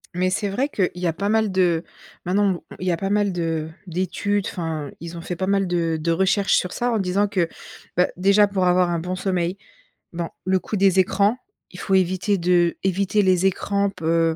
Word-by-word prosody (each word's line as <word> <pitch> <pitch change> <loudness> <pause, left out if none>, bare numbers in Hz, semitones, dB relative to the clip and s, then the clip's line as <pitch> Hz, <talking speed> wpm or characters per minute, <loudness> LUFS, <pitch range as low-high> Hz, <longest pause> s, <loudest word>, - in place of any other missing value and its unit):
Mais 185 +1 +1
c'est 200 +2 -1
vrai 255 +9 -1
qu' 195 -9 0
il 180 - -8
y 180 - +1
a 165 - 0
pas 200 +5 -2
mal 220 -1 +2
de 175 -3 +2 0.4
maintenant, 190 0 +1 0.2
il 185 - -4
y - - +3
a 170 - 0
pas 195 +3 -3
mal 205 -1 +1
de 165 -2 -2 0.2
d'études. 185 +3 -1
Enfin, 160 -4 -4
ils 170 +1 -8
ont - - -6
fait 175 +1 -5
pas 185 +2 -3
mal 195 -1 +2
de 170 -2 0
de 165 +2 0
recherches 190 +3 +2
sur 180 - 0
ça, 245 0 -1
en 230 - +1
disant 195 +2 +1
que, 185 -5 0 0.5
bah, 180 - +4
déjà, 200 +3 +4
pour 195 -2 0
avoir 180 0 +3
un 170 -1 0
bon 180 +3 -3
sommeil 185 -1 -1 0.6
bon, 170 0 -3 0.2
le 185 0 +2
coup 215 - -5
des 195 -1 +3
écrans, 200 +4 +2 0.3
il - - -10
faut 195 - -2
éviter 190 +2 +1
de 175 -1 +2
éviter 195 +2 +1
les 185 -1 +3
écrans, 200 +1 +1
peu 165 -2 +1
185 Hz, 215 wpm, -22 LUFS, 175-200 Hz, 0.6 s, bah